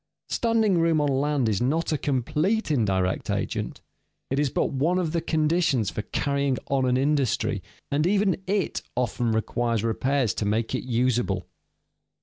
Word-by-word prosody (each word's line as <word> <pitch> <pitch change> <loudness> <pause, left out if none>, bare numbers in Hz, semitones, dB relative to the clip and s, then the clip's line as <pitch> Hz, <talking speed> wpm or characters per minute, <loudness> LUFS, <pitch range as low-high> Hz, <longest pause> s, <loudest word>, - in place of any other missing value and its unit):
Standing 225 -6 +2
room 165 -1 +3
on 145 -1 +2
land 140 -1 +1
is 105 -1 0
not 155 +8 0
a - - +2
complete 150 - 0
indirect 95 -8 0
agent; - - -2 0.5
it 135 - +1
is 145 -2 +2
but - - 0
one 155 +7 +1
of 175 -4 0
the 170 0 0
conditions 155 - +1
for - - -3
carrying 140 +2 -1
on 135 -2 +2
an 125 0 +2
industry, 140 -2 +1 0.3
and 150 +4 +2
even 195 -2 +2
it 195 -2 0
often 120 -1 0
requires 115 0 0
repairs 125 0 +1
to 105 - -2
make 110 +3 0
it 130 - -2
usable. 120 -6 0
140 Hz, 155 wpm, -25 LUFS, 120-160 Hz, 0.5 s, room